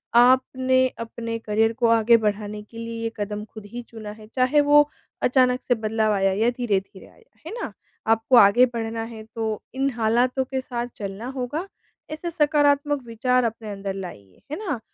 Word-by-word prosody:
आपने 260 +1 +4
अपने 230 0 -4
करियर 225 +1 +1
को 235 0 +1
आगे 230 0 +5
बढ़ाने 210 -1 -2
के 230 - -11
लिए 230 0 -5
ये 225 - -2
कदम 210 0 -3
ख़ुद 215 -1 -12
ही 245 - -4
चुना 215 -2 -8
है 215 0 -13
चाहे 260 +4 +4
वो 295 0 +5 0.4
अचानक 255 0 +3
से 245 - +3
बदलाव 220 -1 0
आया 195 -1 +2
या 220 +5 +2
धीरे-धीरे 205 -6 -2
आया, 470 - -22 0.2
है 330 - -6
ना? - - -4 0.4
आपको 225 +3 +3
आगे 205 +5 +7
बढ़ना 230 -2 -4
है 225 -1 -8
तो 220 -2 -2
इन 270 +1 +1
हालातों 240 +3 +2
के 265 0 -3
साथ 245 -2 -4
चलना 200 +3 -6
होगा, 280 +9 -3 0.4
ऐसे 315 +3 -4
सकारात्मक 290 -2 +2
विचार 250 +2 +1
अपने 225 -2 -3
अंदर 195 -1 -4
लाइए, 105 - -9
है 300 - -2
ना? 290 - -2
230 Hz, 175 wpm, -24 LUFS, 215-255 Hz, 0.4 s, आगे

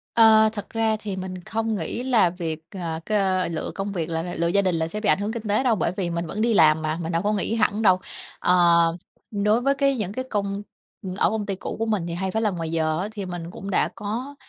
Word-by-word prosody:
Ờ, 220 -1 +7
thật 205 -2 -7
ra 225 -1 +1
thì 200 -3 -4
mình 185 -1 -6
không 225 0 -1
nghĩ 200 +6 -3
là 230 -9 +3
việc, 165 -3 -4
ờ, 170 -5 -4
c - - -16 0.4
lựa 155 - -3
công 200 +1 -3
việc 170 -3 -2
là 165 0 -1
là 175 0 -5
lựa 170 - 0
gia 200 +4 +3
đình 185 -3 +1
là 160 0 -1
sẽ 210 +5 -5
bị 215 - -1
ảnh 155 - +5
hưởng 210 +2 -2
kinh 225 -3 -5
tế 210 +5 +2
đâu, 245 -4 +3
bởi 190 - 0
vì 180 -3 -1
mình 170 0 -2
vẫn 210 +6 -5
đi 230 -1 +2
làm 155 -3 +5
mà 155 +1 -1
mình 165 +1 -3
đâu 165 +2 +1
có 210 +1 +1
nghỉ 210 +2 0
hẳn 220 -1 +1
đâu. 185 -3 +5 0.4
Ờ, 180 - +3 0.8
đối 210 +2 +2
với 275 +2 +2
cái 275 -1 +2
những 200 -3 -3
cái 255 +3 -3
công 200 -1 -2 0.4
ừm, 185 -1 -5
ở 200 - +2
công 215 -2 -2
ty 195 - -1
cũ 190 - -6
của 225 - -1
mình 205 -6 0
thì 170 - -4
hay 190 +2 -2
phải 220 +3 -1
làm 205 -5 0
ngoài 165 -1 -3
giờ 160 0 0
á, 200 - -2
thì 200 -3 -5
mình 175 -1 -6
cũng 195 +2 -7
đã - - +2
có, 240 +7 -4
200 Hz, 275 wpm, -24 LUFS, 170-220 Hz, 0.8 s, Ờ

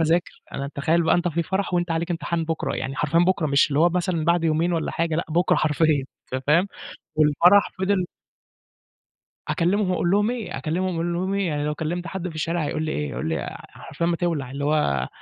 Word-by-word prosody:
أذاكر، 165 +1 0
أنا 140 +1 -4
تخيّل 160 +4 +2
بَقى 160 - +3
أنت 175 0 +1
في 170 0 -1
فرح 190 +1 -2
وأنت 175 -1 0
عليك 165 +2 -1
امتحان 170 -1 -1
بُكرا، 160 0 -2
يعني 130 +1 -4
حرفيًا 150 +4 +1
بُكرا 175 -2 +2
مش 140 -1 +3
اللي 145 -1 0
هو 170 - +6
مثلًا 175 -2 -1
بعد 170 +1 +2
يومين 165 +2 +1
والّا 165 - -1
حاجة، 165 -1 -1
لأ 170 - -1
بُكرا 170 +3 +2
حرفيًا 150 -2 +2 0.3
أنت 130 0 -2
فاهم؟ 170 +7 +4 0.5
والفرح 160 +6 +5
فِضِل 190 -1 +1 1.4
أكلّمهم 185 +2 +1
أقول 175 -1 +1
لهم 205 +3 +3
إيه، 215 -9 -4
أكلّمهم 180 +4 -1
أقول 170 +1 -1
لهم 185 +3 -1
إيه! 200 -1 0
يعني 150 -2 -1
لو 150 0 -1
كلّمت 170 +3 -3
حد 180 +1 -4
في 160 - -11
الشارع 165 +1 -1
هيقول 155 - -2
لي 155 - -2
إيه، 75 -1 -2
هيقول 60 +6 -3
لي 80 - -3
حرفيًا 170 - -5
ما 170 0 +1
تِولع، 160 -8 -2
اللي 140 +1 -5
هو 70 - +1
165 Hz, 210 wpm, -24 LUFS, 150-175 Hz, 1.4 s, هو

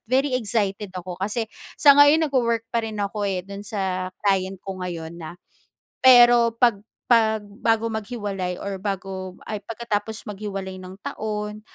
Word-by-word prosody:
very 265 +2 +2
excited 210 -4 -1
ako. 180 0 -7
Kasi, 215 +4 -1 0.3
sa 285 -2 +8
ngayon 300 +3 +6
nag-wowork 235 -5 +1
pa 235 - +2
rin 220 -1 -5
ako, 205 0 -2
eh, 185 -2 -2
do'n 200 +1 -8
sa 190 -4 -2 0.2
client 190 -1 +1
ko 190 -1 -6
ngayon 170 -1 -6
na 165 +2 -8 0.7
Pero 240 -2 +7
'pag 230 -5 +3 0.3
'pag 220 -2 +4
bago 225 +2 0
maghiwalay 205 -5 -3
or 200 -1 -4
bago 190 -1 -4 0.2
ay, 215 - -2
pagkatapos 220 -1 -3
maghiwalay 195 -2 -5
ng 185 0 -9
taon, 210 0 -4
205 Hz, 150 wpm, -23 LUFS, 190-230 Hz, 0.7 s, sa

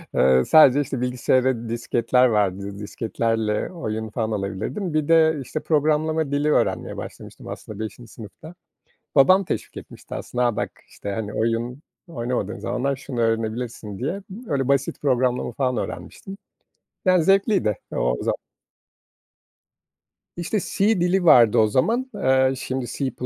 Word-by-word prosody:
Iıı, 65 0 +4
sadece, 145 -3 +6
işte, 135 -3 -4
bilgisayara 125 -1 +1
disketler 120 +1 +2
vardı, 100 -3 0
disketlerle 110 - -2
oyun 110 -10 -4
falan 110 0 -2
alabilirdim. 105 - -3
Bir 155 -1 0
de, 160 -1 +5
işte, 155 - -4
programlama 155 0 +1
dili 145 +1 +1
öğrenmeye - - 0
başlamıştım - - -9
aslında 110 -1 -8
5'inci 110 +2 -7
sınıfta. 120 - -11 0.6
Babam 185 +8 +6
teşvik - - -4
etmişti - - -10
aslında 125 0 -2
"A, 120 - 0
bak.", 120 - -2 0.2
işte, 100 - -7
hani, 105 0 -4
"Oyun 115 +5 -1 0.3
oynamadığın 120 - -3
zamanlar 130 +3 -2
şunu 130 -3 -5
öğrenebilirsin." 115 -2 -2
diye. 185 +10 -3 0.3
Öyle, 135 -3 0
basit 140 -1 0
programlama 125 -3 +1
falan 130 0 -1
öğrenmiştim. 195 - -6 0.7
Yani 185 -3 +4
zevkliydi 195 - +2
o - - 0
za - - +1 2.1
İşte, 175 +5 -1
C 200 +2 +1
dili 180 +1 +2
vardı 120 -9 +7
o 110 - +5
zaman. 230 - 0
Eee, 130 -7 +3
şimdi 130 -1 -3
C++ 135 -2 -3
125 Hz, 135 wpm, -23 LUFS, 110-155 Hz, 2.1 s, vardı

